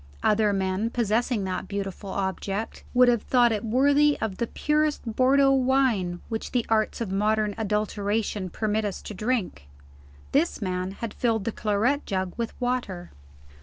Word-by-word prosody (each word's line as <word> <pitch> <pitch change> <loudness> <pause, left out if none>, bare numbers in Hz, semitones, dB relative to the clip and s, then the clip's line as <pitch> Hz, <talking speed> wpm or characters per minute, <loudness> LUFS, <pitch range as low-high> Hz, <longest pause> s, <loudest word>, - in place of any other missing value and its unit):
Other 210 0 +3
men, 190 +2 0
possessing 230 -1 0
that 185 -1 -3
beautiful 200 0 -5
object, 195 +2 -3
would 250 0 +5
have 240 -3 +3
thought 240 0 +3
it 210 -2 -1
worthy 285 +5 +3
of 210 -4 -3
the 235 - -1
purest 300 +2 0
Bordeaux 270 +2 +4
wine 255 -9 +2
which 225 -1 -5
the 245 -2 +1
arts 220 +1 +1
of 215 -5 -3
modern 210 +1 +1
adulteration 210 -2 -1
permit 215 +3 -1
us 205 -3 -3
to - - -7
drink. 205 - -2 0.6
This 310 +5 +1
man 185 -1 -2
had 220 +1 -6
filled 225 -4 0
the 230 - -1
claret 220 +8 0
jug 185 -2 -2
with 235 -1 -4
water. 245 -8 -2
215 Hz, 155 wpm, -26 LUFS, 195-245 Hz, 0.6 s, would